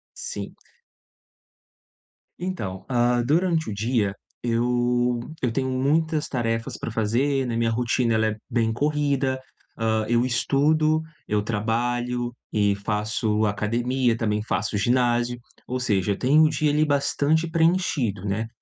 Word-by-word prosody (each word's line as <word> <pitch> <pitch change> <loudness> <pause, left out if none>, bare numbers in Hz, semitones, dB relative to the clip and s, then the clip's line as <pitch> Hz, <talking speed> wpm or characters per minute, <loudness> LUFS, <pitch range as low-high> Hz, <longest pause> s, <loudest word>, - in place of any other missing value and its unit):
Sim. - - -6 1.8
Então, 110 - -4
ah, 120 -1 +2
durante 165 +2 +1
o - - -3
dia 105 -1 0 0.3
eu 120 +1 +1 0.2
eu 125 - +1
tenho 130 +2 -1
muitas 150 +4 +1
tarefas 115 -3 -2
para - - -5
fazer, 125 +5 +1
né, 120 - -2
minha 115 0 +1
rotina, 120 0 +1
ela 110 0 +2
é 110 - -1
bem 115 -1 +1
corrida. 140 -1 0 0.4
Ah, 110 -1 +1
eu 120 +1 +2
estudo, 155 +5 +2 0.3
eu 105 0 +1
trabalho 120 +3 -1 0.2
e 100 -2 +2
faço 105 +1 -1
academia, 120 +4 0
também 105 -2 0
faço 105 -1 -1
ginásio, 120 +2 +1 0.3
ou 130 +1 -2
seja, 105 -5 +1
eu 100 - -1
tenho 145 +5 +4
o 155 - +5
dia, 155 0 +1
ali, 150 +1 +3
bastante 145 +2 +1
preenchido, 160 - +1
né. 105 +3 -1
120 Hz, 130 wpm, -24 LUFS, 110-140 Hz, 1.8 s, o